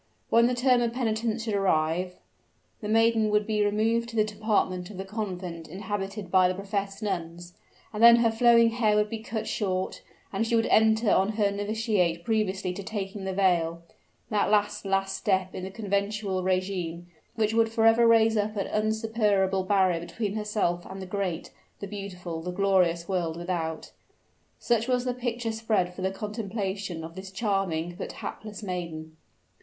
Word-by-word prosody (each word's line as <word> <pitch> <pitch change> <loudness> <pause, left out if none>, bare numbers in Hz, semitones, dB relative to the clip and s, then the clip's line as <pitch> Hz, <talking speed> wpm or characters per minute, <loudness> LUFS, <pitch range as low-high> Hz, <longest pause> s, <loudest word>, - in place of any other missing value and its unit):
When 235 +1 +6
the 250 - 0
term 250 0 +3
of 235 -1 0
penitence 225 -2 -1
should 220 -2 -2
arrive, 180 -2 +1 0.6
the 210 - -6
maiden 225 0 +3
would 210 0 +2
be 215 -1 +1
removed 225 +3 +1
to 230 - -9
the 215 - +4
department 205 -4 -1
of 205 - -10
the 190 - -5
convent 185 -5 -5
inhabited 195 +1 -5
by 185 -1 +5
the 185 - -1
professed 200 +1 -4
nuns; 175 -3 -4 0.4
and 210 - -3
then 235 0 +10
her 235 -1 +3
flowing 230 0 +5
hair 225 -3 +2
would 210 0 +1
be 225 - -3
cut 220 0 -4
short, 185 -3 -2 0.3
and 225 - 0
she 235 - +1
would 225 0 +3
enter 220 0 +4
on 195 +3 +3
her 205 -2 +1
novitiate 205 -4 0
previously 195 -4 0
to 190 - -6
taking 195 -1 -5
the 190 - -2
veil, 170 -3 +1 0.5
that 210 -1 +2
last, 210 0 +1
last 195 0 0
step 190 -2 0
in 185 - -6
the 190 - -4
conventual 200 -1 -2
regime, 185 -2 -2 0.3
which 220 0 +1
would 225 0 +3
forever 225 +1 +5
raise 225 -1 +5
up 210 0 0
an 195 - 0
insuperable 215 -3 +1
barrier 185 -3 +2
between 200 +4 -4
herself 210 -5 -1
and 190 +1 -8
the 190 - -6
great, 185 -3 -3 0.3
the - - -5
beautiful, 185 -4 -6
the 180 - -5
glorious 180 -3 +2
world 170 -4 -1
without! 170 -2 -3 0.7
Such 235 -1 0
was 250 -1 +1
the 250 - 0
picture 240 -2 -3
spread 220 -5 0
for 185 - -8
the 190 - +1
contemplation 200 -4 -4
of 165 +1 -8
this 190 +2 -8
charming, 190 -5 -1
but - - -5
hapless 215 0 -7
maiden. 170 -4 -5
200 Hz, 170 wpm, -27 LUFS, 185-220 Hz, 0.7 s, then